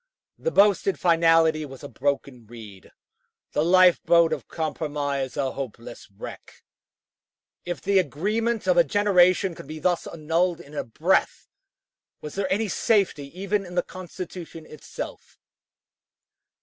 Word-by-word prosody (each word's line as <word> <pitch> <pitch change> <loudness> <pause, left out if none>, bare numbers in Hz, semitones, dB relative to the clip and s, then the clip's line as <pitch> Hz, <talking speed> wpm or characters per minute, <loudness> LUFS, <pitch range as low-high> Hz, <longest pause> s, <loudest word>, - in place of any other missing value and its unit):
The 485 - -1
boasted 200 - +3
finality 165 -2 +3
was 135 -2 -10
a - - -6
broken 140 -4 -3
reed; 110 -4 -12 0.6
the 150 - +1
life 180 +1 +5
boat 170 -1 +4
of - - -6
compromise 145 -4 -3
a 135 -2 0
hopeless 120 -4 -8
wreck. 100 - -11 1.0
If 175 0 -4
the 200 0 +3
agreement 210 - -1
of 180 -2 +2
a 170 - +7
generation 185 +1 +3
could 150 - -11
be 155 +1 -7
thus 175 +2 0
annulled 165 +2 -1
in 150 -3 -14
a 150 - -3
breath, 115 - 0 0.7
was 150 - -8
there 190 -1 -2
any 215 +3 +1
safety 195 -6 +1
even 200 +1 -1
in 180 -1 -10
the 175 - +2
Constitution 175 -2 -9
itself? 155 - -9
165 Hz, 135 wpm, -25 LUFS, 145-185 Hz, 1.0 s, a